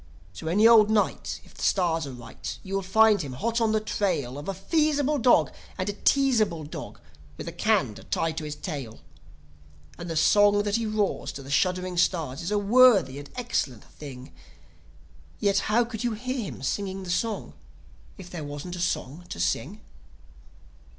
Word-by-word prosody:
So 160 - -8
any 205 +7 +5
old 220 -2 +7
night, 215 -1 0
if - - -19
the - - -12
stars 165 -5 +1
are - - -6
right, 120 -2 -8
vou 195 - -7
will - - -1
find 210 +2 +4
him, 140 -4 -6
hot 230 - -1
on 225 -1 +2
the 215 - +2
trail 180 - -2
Of 145 - -6
a - - -1
feasible 300 - +1
dog 225 - +4 0.2
and 185 - -2
a - - -2
teasable 220 - +2
dog, 145 -8 -8 0.4
with - - -7
a - - -3
can 175 - +1
to - - -12
tie 165 - -1
to 160 0 -5
his 150 -1 -5
tail. 140 -10 -6 1.0
And 175 0 -6
the 165 - -3
song 205 +5 +4
that 205 +1 0
he 230 -1 -2
roars 215 -2 -1
to 140 - -8
the 135 - -9
shuddering 180 +3 0
stars 165 -7 0
is 170 - -3
a 210 - +1
worthy 205 - +5
and 145 - -10
excellent 190 - -2
thing. 130 -3 -11 1.1
(Yet 200 -1 +2
how 235 +3 +3
could 230 -1 -6
you 240 -2 0
hear 250 +1 -3
him - - -10
singing 190 +5 -3
a - - -8
song 220 +4 -2 0.6
if 190 -3 -10
there 175 -3 -6
wasn't 145 +5 -6
a - - -7
song 175 -1 -3
to - - -6
sing?) 85 - -1
190 Hz, 185 wpm, -26 LUFS, 150-220 Hz, 1.1 s, old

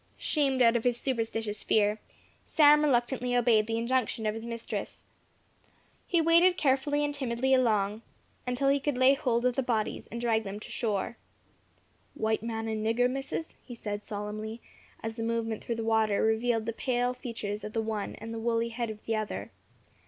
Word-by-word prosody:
Shamed 270 -4 +1
out 230 0 +5
of 235 - +1
his 245 -1 +2
superstitious 225 -4 -2
fear, 210 0 +2 0.4
Sam 300 -1 +6
reluctantly 250 -2 +1
obeyed 225 -3 +4
the 225 0 -1
injunction 235 -1 0
of 215 - +1
his 225 +1 -6
mistress. 230 0 -5 1.0
He 345 - +2
waded 335 +3 +5
carefully 290 +1 +2
and 290 - -2
timidly 265 -1 0
along, 215 -4 +2 0.5
until 255 +2 +1
he 280 +1 +3
could 280 -2 -1
lay 260 +2 +6
hold 245 -3 0
of 250 -1 +2
the 270 - +1
bodies, 230 -4 -2
and 235 - -6
drag 225 -2 +1
them 200 0 -6
to - - -9
shore. 215 0 -2 1.0
"W'ite 220 0 0
man 225 -1 -3
and 220 -1 -2
nigger, 230 +3 +2
Missus," 270 +5 -4
he 245 - -9
said, 210 -2 -5
solemnly, 215 +2 -5 0.4
as 225 +1 -4
the - - -3
movement 225 -1 -2
through 235 - -2
the 225 - -3
water 220 -2 +2
revealed 225 0 +1
the 230 - -2
pale 245 0 0
features 225 -5 -5
of 210 - -6
the 225 - 0
one, 220 -2 -3
and 225 +1 -7
the 225 - -4
woolly 230 0 0
head 235 0 -3
of 215 -1 -9
the 225 - 0
other. 215 -1 -4
230 Hz, 180 wpm, -29 LUFS, 220-255 Hz, 1.0 s, Sam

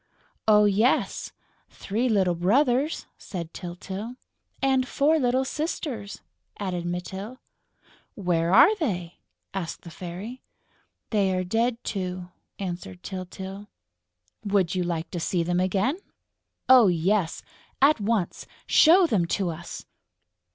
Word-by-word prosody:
"Oh, 210 -1 +6
yes, 210 +5 +1 0.4
three 230 +6 -2
little 190 -5 +3
brothers!" 250 - +2
said 170 -4 -6
Tyltyl. 190 +6 -6 0.4
"And 265 -1 +2
four 305 +5 +2
little 255 0 +2
sisters," 265 -8 -4 0.4
added 180 -4 -3
Mytyl. 190 +7 -5 0.8
"Where 175 -4 0
are 335 - +7
they?" 180 - -3 0.3
asked 185 -4 -4
the 170 - -10
Fairy. 185 +10 -7 0.7
"They 195 -4 +2
are 185 - 0
dead, 230 +5 0
too," 185 -2 -4 0.3
answered 175 - -6
Tyltyl. 190 +2 -7 0.8
"Would 200 -4 +1
you 185 - 0
like 170 -2 -3
to 175 - -3
see 170 +1 0
them 175 +1 0
again?" 195 - +1 0.7
"Oh, 255 -5 +8
yes!... 180 +1 +1 0.4
At 280 -3 +4
once!... 205 -4 -1 0.2
Show 350 +4 +6
them 195 - +1
to 185 -1 0
us!..." 170 +2 -8
195 Hz, 115 wpm, -26 LUFS, 180-245 Hz, 0.8 s, Oh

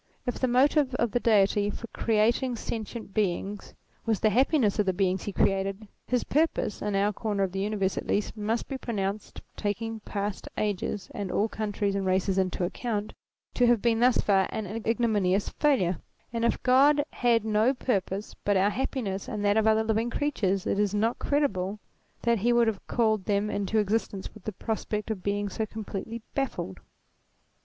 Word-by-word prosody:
If 245 - -2
the 255 - +2
motive 265 +2 +3
of 235 -3 0
the 245 - +1
Deity 205 -2 +3
for 220 - -6
creating 230 +3 +2
sentient 220 -2 -5
beings 200 0 -2 0.3
was 220 -4 0
the 215 - +3
hap 255 +6 +4
piness 230 -10 +2
of 205 - +2
the 190 - +3
beings 185 0 0
he 205 - -2
created, 195 +2 0 0.2
his 250 -1 +1
purpose, 305 -8 0
in 205 -1 -1
our 200 +2 +2
corner 205 -2 -1
of 190 - -1
the 195 - -3
universe" 195 -1 0
at - - -8
least, 210 - 0
must 220 +2 -2
be 270 -2 -5
pronounced, 205 -3 -3
taking 220 +2 -3
past 205 -1 -4
ages 205 -1 -2
and 200 -3 -4
all 205 +4 +2
countries 205 -2 -2
and 195 -1 -1
races 190 +1 +2
into 185 -1 0
account, 210 +3 -2 0.4
to 245 - +3
have 240 -1 +4
been 225 +1 +2
thus 245 +1 +4
far 195 -2 +3
an 220 - -3 0.2
ignominious 210 -5 +2
failure; 190 - +1 0.3
and 230 0 0
if 235 - 0
God 285 +3 +5
had 235 -3 +2
no 220 +3 +3
purpose 200 -5 -2
but 205 -1 +2
our 195 +2 +3
happiness 210 -4 -3
and 205 -1 -3
that 205 0 +4
of 220 0 +3
other 220 0 +4
living 220 +1 0
creatures 200 -9 0
it 200 - 0
is 205 -1 +1
not 225 +3 +1
credible 210 -10 0 0.5
that 235 -2 +2
he 235 +5 +2
would 240 0 +4
have 220 -3 -2
called 220 -5 +1
them 205 0 +1
into 200 +2 -1
existence 210 -2 -1
with 215 - -15
the 215 - -2
prospect 215 +1 -3
of 205 -4 -4
being 205 +1 -1
so 210 +3 -3
completely 220 +1 -6
baffled. 265 - -3
210 Hz, 185 wpm, -28 LUFS, 195-235 Hz, 0.5 s, God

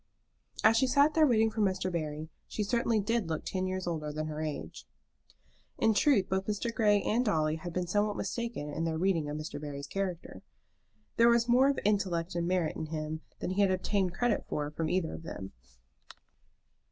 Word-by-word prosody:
As 220 +1 +6
she 265 - +3
sat 285 +4 +4
there 315 -1 +5
waiting 225 -3 +3
for 215 0 -2
Mr. 185 -2 0
Barry, 155 -2 -4 0.2
she 210 - -2
certainly 230 +1 +1
did 215 -3 0
look 160 -1 -3
ten 185 0 -2
years 185 0 -3
older 155 -3 -3
than 155 +1 -3
her 155 0 -4
age. 155 -2 -5 0.9
In 225 0 +3
truth 215 -4 +3
both 190 0 -1
Mr. 215 +3 -2
Grey 210 -3 +3
and 235 +3 +1
Dolly 155 -8 +1
had 175 +2 -6
been 180 +1 -1
somewhat 205 +3 0
mistaken 230 -12 -3
in 165 - -2
their 160 -1 -1
reading 165 -4 +1
of 150 - -3
Mr. 155 -1 -6
Barry's 140 -1 -6
character. 180 - -4 0.8
There 235 +1 +6
was 235 0 +3
more 255 +3 +5
of 280 - 0
intellect 185 -4 +1
and 170 0 -1
merit 180 -3 0
in 160 - -4
him 155 0 -4 0.2
than - - -2
he 195 +2 +1
had 200 - +4
obtained 185 -1 0
credit 240 0 +1
for 150 0 -2
from 155 +1 -2
either 180 -2 0
of - - -7
them. 95 -12 -7
185 Hz, 195 wpm, -31 LUFS, 160-220 Hz, 0.9 s, As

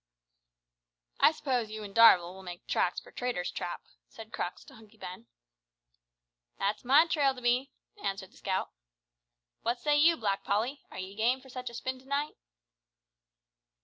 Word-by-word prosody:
"I - - +7
suppose 255 -7 -1
you 215 0 -6
an' 200 -1 -8
Darvall 185 -6 +7
will 190 - -11
make 175 -2 -9
tracks - - +1
for - - -16
Traitor's 245 -8 -2
Trap," 175 - -5 0.3
said 225 0 -12
Crux 175 - -4
to - - -15
Hunky 220 -1 -17
Ben. 190 +3 -9 1.3
"That's 205 +2 -1
my 275 +6 +6
trail 285 -5 +2
to 250 - -10
be," 250 +3 +2 0.3
answered 195 -1 -3
the - - -20
scout. 190 -1 -2 0.9
"What 240 +1 -1
say 295 +3 +2
you, 325 +3 +5
Black 200 -3 -1
Polly? 230 +8 -1
Are - - -10
ye 185 +1 -6
game 240 +5 +2
for 265 0 -16
such 255 -1 -5
a 235 - -11
spin 260 +2 -4
to 260 - -20
night?" 285 +2 -1
230 Hz, 165 wpm, -30 LUFS, 195-260 Hz, 1.3 s, I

